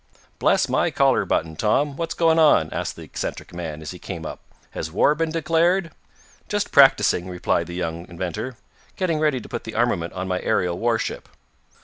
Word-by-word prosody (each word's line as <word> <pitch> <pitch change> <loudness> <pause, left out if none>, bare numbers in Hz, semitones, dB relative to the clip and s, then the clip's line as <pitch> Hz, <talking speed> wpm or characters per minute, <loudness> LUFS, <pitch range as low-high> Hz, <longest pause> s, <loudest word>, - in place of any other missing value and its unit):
"Bless - - +3
my - - +1
collar - - +2
button, 80 0 -1
Tom! 135 - +1
What's 165 +2 -3
going 165 -1 +3
on?" 120 - +5
asked - - -3
the - - -10
eccentric - - -6
man, 80 -3 -6
as 75 - -6
he 90 - -10
came 85 -3 -6
up. - - -6 0.3
"Has 80 - -5
war 105 - +4
been 165 +1 -1
declared?" 165 +2 +1 0.6
"Just 205 0 -1
practicing," 105 - +5
replied 90 -2 -1
the 85 - -7
young 85 -1 -4
inventor. 90 +8 -5 0.4
"Getting 170 -5 0
ready 150 -4 +2
to - - -11
put - - -5
the 110 - -8
armament 105 -8 0
on 95 0 -4
my 90 -1 -1
aerial 90 -1 0
warship." 115 -1 -1
110 Hz, 185 wpm, -23 LUFS, -, 0.6 s, on